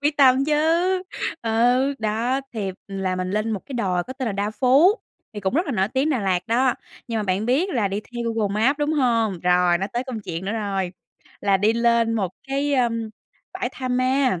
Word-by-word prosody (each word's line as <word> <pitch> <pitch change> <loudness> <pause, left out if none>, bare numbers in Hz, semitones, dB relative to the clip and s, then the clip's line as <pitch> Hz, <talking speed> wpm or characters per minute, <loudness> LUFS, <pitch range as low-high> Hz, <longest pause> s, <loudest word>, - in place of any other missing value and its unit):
Quyết 295 0 +1
tâm 265 -1 +5
chứ, 300 - +1 0.9
ừ, 245 +5 +2
đó, 225 +5 0
thì 205 -5 -3 0.2
là 190 -2 -2
mình 185 0 -2
lên 215 +2 -1
một 205 -4 -2
cái 270 - -7
đồi 185 -6 0
có 260 - -7
tên 260 -2 -4
là 220 - -1
Đa 200 +1 -1
Phú, 270 - +5 0.4
thì 210 - -6
cũng 190 +3 -1
rất 340 +5 +1
là 285 - -2
nổi 195 -3 +1
tiếng 270 +6 0
Đà 265 - +1
Lạt 185 -3 0
đó, 245 +2 +2 0.3
nhưng 230 -1 -1
mà - - -1
bạn 200 +2 -1
biết 285 +10 +2
là 215 - +1
đi 200 +2 -2
theo 235 +1 -4
Google 210 -3 -1
Maps, 260 +8 +2
đúng 295 +1 0
hông? 230 - +1
Rồi 180 0 +3
nó 195 - -1
tới 240 +2 -2
công 250 -5 -5
chuyện 175 -2 -5
nữa 200 - -2
rồi, 195 -4 -2 0.5
là 200 -1 +3
đi 210 +3 +2
lên 235 0 +2
một 195 -5 -1 0.2
cái, 280 +1 0
ơ, 245 -2 +3 0.6
bãi 370 -9 -2
tha 255 -1 -5
ma. 255 -4 +1
230 Hz, 220 wpm, -23 LUFS, 200-260 Hz, 0.9 s, tâm